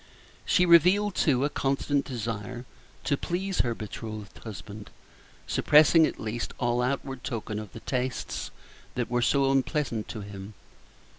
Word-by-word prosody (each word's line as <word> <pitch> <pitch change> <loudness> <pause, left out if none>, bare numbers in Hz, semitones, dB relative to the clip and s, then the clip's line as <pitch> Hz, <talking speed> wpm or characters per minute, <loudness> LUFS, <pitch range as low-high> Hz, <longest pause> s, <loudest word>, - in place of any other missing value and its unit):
She 180 -3 +4
revealed, 180 +4 +5
too, 135 -6 +2
a - - +1
constant 140 0 0
desire 120 0 -5 0.4
to 145 - +1
please 190 +4 -2
her 120 -2 +1
betrothed 110 -1 -7
husband, 105 -1 -9 0.6
suppressing, 155 +2 +5
at - - -6
least, 110 +2 -4
all 120 0 +1
outward 135 0 -2
token 110 -4 -3
of 105 -3 -8
the 115 - -10
tastes 130 -1 -3 0.5
that 125 -1 -2
were 120 0 +2
so 135 +2 +3
unpleasant 135 -4 0
to 110 - -6
him. 100 +1 -9
125 Hz, 140 wpm, -28 LUFS, 110-145 Hz, 0.6 s, revealed